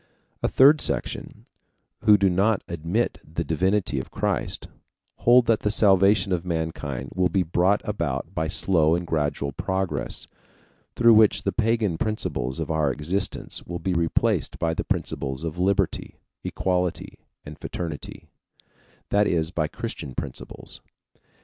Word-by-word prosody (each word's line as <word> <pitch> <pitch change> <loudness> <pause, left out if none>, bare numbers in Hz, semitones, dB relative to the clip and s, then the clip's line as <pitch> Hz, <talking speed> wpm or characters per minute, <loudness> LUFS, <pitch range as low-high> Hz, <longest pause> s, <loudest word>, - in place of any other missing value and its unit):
A - - +2
third 145 +3 +6
section, - - -3 0.6
who 105 -1 +7
do 100 0 +3
not 95 +4 +2
admit 85 +8 -2
the 80 +2 -4
divinity 90 -2 0
of 65 - -7
Christ, - - -2 0.5
hold 120 +1 +5
that 115 -2 +3
the 105 - 0
salvation 100 -2 +4
of 90 -2 0
mankind 80 -6 -3
will 90 -1 +2
be 95 +2 +1
brought 90 +4 +2
about 105 -1 -3
by 80 - -1
slow 80 -1 +2
and 90 0 -3
gradual 75 -3 -1
progress, 95 +6 -3 0.7
through 115 -1 +6
which 110 -1 +5
the - - 0
pagan 110 -6 0
principles 65 - -2
of - - -3
our 75 -3 +1
existence 85 +8 -3
will 85 - -4
be 95 +1 -2
replaced 85 -1 +1
by 80 -1 0
the - - -2
principles 65 +2 -3
of 80 +1 -4
liberty, 95 +1 0 0.3
equality, 90 -2 -2 0.3
and 75 +1 -10
fraternity 80 -4 -6 0.8
that 105 0 +3
is, 80 -1 0
by 80 -4 0
Christian 65 -3 -6
principles. 65 - -7
90 Hz, 140 wpm, -25 LUFS, 80-100 Hz, 0.8 s, who